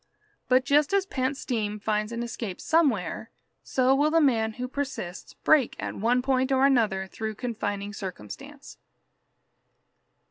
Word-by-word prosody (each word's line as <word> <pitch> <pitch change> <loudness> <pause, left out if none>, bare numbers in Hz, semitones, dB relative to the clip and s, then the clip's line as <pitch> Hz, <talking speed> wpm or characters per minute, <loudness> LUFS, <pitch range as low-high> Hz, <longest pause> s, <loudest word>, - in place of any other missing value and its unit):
But 255 0 +4
just 290 +4 +3
as 395 -1 +3
pent 265 -6 -2
steam 210 -6 -2
finds 210 +1 -1
an 235 0 -3
escape 225 -5 -5
somewhere, 230 - +1 0.3
so 260 0 +2
will 290 +3 +3
the 330 +1 +4
man 225 -7 +2
who 250 +3 -4
persists 265 -10 -5
break 295 -6 +3
at - - -4
one 245 +4 +1
point 260 0 +1
or 265 0 +4
another 220 -8 +2
through 220 +3 -5
confining 205 -4 -3
circumstance. 185 - -8
245 Hz, 140 wpm, -27 LUFS, 210-270 Hz, 0.3 s, But